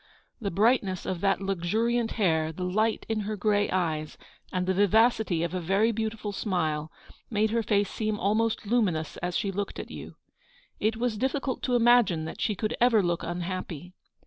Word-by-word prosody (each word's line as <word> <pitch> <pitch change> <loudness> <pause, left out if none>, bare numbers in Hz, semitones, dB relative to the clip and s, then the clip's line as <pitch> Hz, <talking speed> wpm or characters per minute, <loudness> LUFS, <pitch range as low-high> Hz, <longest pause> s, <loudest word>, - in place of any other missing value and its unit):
The 200 - -1
brightness 200 -1 +2
of 180 -2 -3
that 195 0 +2
luxuriant 220 +6 0
hair, 160 -7 +1
the 180 +3 -6
light 215 +5 0
in 220 -1 -1
her 210 +1 -3
grey 205 +1 +1
eyes, 160 -4 -1 0.3
and 180 -1 -1
the 190 - +1
vivacity 205 -2 +3
of 170 0 -2
a 185 - -1
very 195 +7 +2
beautiful 220 -1 -3
smile, 160 -7 -1 0.4
made 215 -1 +1
her 230 0 +1
face 205 -2 +1
seem 215 -1 -2
almost 220 +3 +1
lumi 215 -4 +2
nous 155 -1 -5
as 175 0 -2
she 200 - -1
looked 200 +1 -4
at - - -7
you. - - -9 0.6
It 220 +1 0
was 235 -3 -1
difficult 265 +1 -1
to 250 - +1
imagine 230 -9 +4
that 160 - -7
she 210 - 0
could 215 +3 -2
ever 235 -4 +5
look 175 -1 0
unhappy. 175 -1 -5
205 Hz, 180 wpm, -27 LUFS, 180-225 Hz, 0.6 s, ever